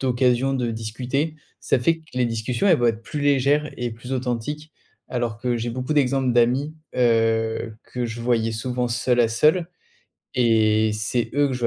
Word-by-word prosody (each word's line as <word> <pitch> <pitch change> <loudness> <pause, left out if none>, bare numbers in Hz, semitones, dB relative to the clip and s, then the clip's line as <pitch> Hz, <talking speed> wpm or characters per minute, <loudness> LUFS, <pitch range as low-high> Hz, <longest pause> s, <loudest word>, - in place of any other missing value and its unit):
d'occasions 130 +1 +2
de 125 -3 -1
discuter, 125 +8 -3 0.2
ça - - +1
fait 165 +7 +2
que 160 - -22
les 125 -1 +1
discussions 115 - -1
elles 175 -6 +5
vont 120 - +2
être 115 -1 0
plus 150 - -5
légères 145 +1 +2
et 120 -1 -3
plus 120 +4 -8
authentiques. 130 +5 -3 0.4
Alors 120 -3 -2
que 120 0 -1
j'ai 115 +1 -3
beaucoup 125 +4 -3
d'exemples 135 -3 +2
d'amis, 125 +6 +2 0.2
heu, 115 -2 +1
que 125 -1 -4
je 115 +1 -6
voyais 115 -2 +1
souvent 125 +2 -2
seul 120 +1 +1
à 115 - +4
seul. 155 +9 +2 0.7
Et 110 -3 +3
c'est 110 +3 -1
eux 145 0 +3
que 135 - -3
je 125 - -5
vais 120 - +2
125 Hz, 185 wpm, -23 LUFS, 115-135 Hz, 0.7 s, elles